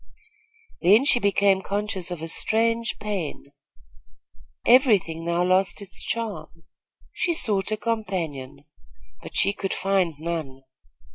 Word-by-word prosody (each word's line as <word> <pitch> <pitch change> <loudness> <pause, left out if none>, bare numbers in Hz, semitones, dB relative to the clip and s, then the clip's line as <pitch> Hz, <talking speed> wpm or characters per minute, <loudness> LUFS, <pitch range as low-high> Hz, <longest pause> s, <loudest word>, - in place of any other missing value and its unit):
Then 210 +9 +5
she 245 - +5
became 200 -2 +3
conscious 200 -2 -3
of 175 -3 -5
a - - -4
strange 230 +6 0
pain. 195 -9 -5 1.1
Every 250 -3 +6
thing 165 -2 -8
now 170 +1 0
lost 185 +1 +2
its 200 -2 -8
charm. 215 -7 -5 0.5
She 345 - 0
sought 210 - 0
a 215 - 0
companion; 165 - -4 0.6
but - - -11
she 200 - +3
could 195 -1 -3
find 190 -4 +1
none. 155 -5 -5
195 Hz, 125 wpm, -24 LUFS, 165-215 Hz, 1.1 s, Every